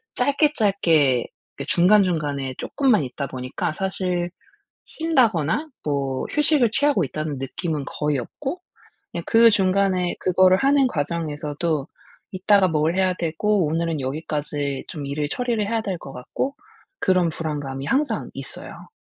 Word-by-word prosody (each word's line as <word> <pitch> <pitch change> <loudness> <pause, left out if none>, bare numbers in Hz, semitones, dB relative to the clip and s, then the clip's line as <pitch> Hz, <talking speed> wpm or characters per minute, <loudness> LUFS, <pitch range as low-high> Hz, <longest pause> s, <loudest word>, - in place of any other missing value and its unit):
짧게 285 +3 +2
짧게 160 - +3 0.3
이렇게 - - -5
중간중간에 160 -8 +2
쪼끔만 255 - +1
있다 135 +2 -4
보니까 130 +3 -4
사실 180 -1 -2 0.6
쉰다거나 260 - +1 0.2
뭐 140 -3 -1
휴식을 295 -6 +3
취하고 285 - +2
있다는 155 +1 -4
느낌은 150 +2 -3
거의 150 -2 -1
없고 275 - -5 0.5
그냥 170 - -4
그 230 0 +7
중간에 190 -3 +2
그거를 185 0 +4
하는 275 +2 +3
과정에서도 150 - -2 0.5
이따가 195 +1 +4
뭘 160 +2 +1
해야 185 -1 +2
되고 180 +3 0
오늘은 165 -1 -1
여기까지 145 0 -3
좀 145 -4 -6
일을 145 +1 -2
처리를 240 -4 -1
해야 225 +1 -1
될 190 -5 -3
것 135 - -10
같고 260 - -4 0.4
그런 185 -2 +3
불안감이 145 -4 -2
항상 285 +2 0
있어요. - - -7
175 Hz, 305 characters per minute, -23 LUFS, 145-210 Hz, 0.6 s, 그